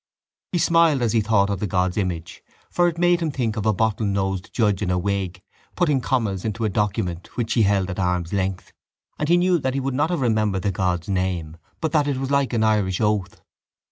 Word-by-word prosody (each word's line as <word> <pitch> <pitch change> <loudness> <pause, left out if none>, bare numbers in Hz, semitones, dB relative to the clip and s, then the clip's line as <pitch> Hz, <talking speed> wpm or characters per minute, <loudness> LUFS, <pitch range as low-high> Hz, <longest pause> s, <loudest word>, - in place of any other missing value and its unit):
He 180 - 0
smiled 165 -5 +3
as 115 - +1
he 115 - +3
thought 105 -2 +2
of 100 - -2
the 105 - -2
god's 90 0 0
image 90 -5 -3 0.3
for 175 0 +3
it 170 -1 -2
made 175 0 +3
him 165 - 0
think 120 -6 -2
of 110 -1 -2
a - - +5
bottle 110 +1 0
nosed 95 0 -2
judge 105 -4 +1
in 100 - -1
a 90 - +1
wig, 95 -1 -2 0.3
putting 150 -7 +2
commas 110 -8 -1
into 110 +1 -2
a - - +1
document 95 -3 -2
which 115 -2 -1
he 115 - +3
held 100 -2 +2
at 90 - -5
arm's 90 -1 -1
length, 95 -2 -2 0.5
and 150 - -1
he 175 - +5
knew 180 0 +3
that 130 -2 -2
he - - +1
would 135 0 -2
not 145 +5 +1
have 175 -5 -1
remembered 110 -5 +1
the 100 - +1
god's 90 -2 -1
name 90 -5 -2 0.3
but 160 -2 -1
that 150 -2 +2
it 140 -2 0
was 135 +1 -3
like 140 -1 +2
an 115 -2 +1
Irish 105 -4 +1
oath. 105 -3 -1
105 Hz, 230 wpm, -23 LUFS, 95-135 Hz, 0.5 s, a